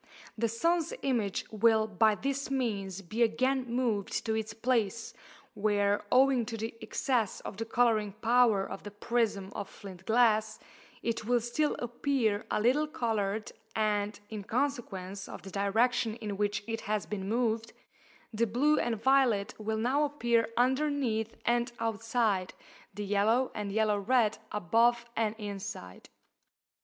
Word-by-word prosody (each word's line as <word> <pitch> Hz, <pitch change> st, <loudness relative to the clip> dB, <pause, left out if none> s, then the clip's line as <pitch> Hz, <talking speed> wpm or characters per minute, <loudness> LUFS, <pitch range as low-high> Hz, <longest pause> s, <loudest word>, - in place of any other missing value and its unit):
The 230 Hz, +1 st, 0 dB
sun's 335 Hz, -, 0 dB
image 230 Hz, -8 st, 0 dB
will 220 Hz, 0 st, +4 dB
by 215 Hz, +1 st, +3 dB
this 275 Hz, +6 st, -2 dB
means 200 Hz, -8 st, -2 dB
be 215 Hz, +7 st, -4 dB
again 255 Hz, +3 st, +2 dB
moved 235 Hz, -5 st, -1 dB
to 220 Hz, -, 0 dB
its 220 Hz, 0 st, -2 dB
place, 230 Hz, -1 st, -1 dB, 0.4 s
where, 205 Hz, -1 st, +1 dB
owing 260 Hz, -1 st, +5 dB
to 225 Hz, -, -4 dB
the 225 Hz, +1 st, -4 dB
excess 240 Hz, -6 st, -1 dB
of -, -, -7 dB
the 225 Hz, -, -3 dB
colouring 220 Hz, -4 st, +2 dB
power 225 Hz, -2 st, +3 dB
of -, -, -7 dB
the 205 Hz, -, -7 dB
prism 205 Hz, -2 st, -1 dB
of 200 Hz, -, -5 dB
flint 190 Hz, -2 st, -11 dB
glass, 220 Hz, -2 st, +3 dB, 0.5 s
it 230 Hz, -1 st, -2 dB
will 245 Hz, +1 st, +3 dB
still 240 Hz, +6 st, 0 dB
appear 240 Hz, -3 st, -1 dB
a -, -, 0 dB
little 260 Hz, +8 st, +3 dB
coloured, 220 Hz, -8 st, -2 dB, 0.2 s
and, 210 Hz, -1 st, 0 dB
in 215 Hz, -1 st, -4 dB
consequence 200 Hz, -7 st, -3 dB
of -, -, -9 dB
the 195 Hz, -, -9 dB
direction 220 Hz, +3 st, +1 dB
in 210 Hz, -3 st, -5 dB
which 205 Hz, 0 st, -1 dB
it 225 Hz, -1 st, -3 dB
has 210 Hz, 0 st, -1 dB
been 195 Hz, -2 st, -4 dB
moved, 230 Hz, -1 st, 0 dB, 0.6 s
the 230 Hz, +2 st, +1 dB
blue 280 Hz, +8 st, +3 dB
and 230 Hz, -2 st, -1 dB
violet 260 Hz, -7 st, +3 dB
will 220 Hz, +1 st, -2 dB
now 255 Hz, +7 st, +2 dB
appear 240 Hz, -6 st, +1 dB
underneath 255 Hz, -4 st, +1 dB
and 240 Hz, 0 st, +1 dB
outside, 225 Hz, -3 st, 0 dB, 0.4 s
the 205 Hz, +1 st, -5 dB
yellow 215 Hz, +6 st, +2 dB
and 205 Hz, -1 st, -4 dB
yellow 215 Hz, -1 st, +2 dB
red 220 Hz, 0 st, +2 dB
above 230 Hz, +5 st, +2 dB
and 220 Hz, -1 st, 0 dB
inside. 200 Hz, -, -7 dB
225 Hz, 145 wpm, -30 LUFS, 205-245 Hz, 0.6 s, owing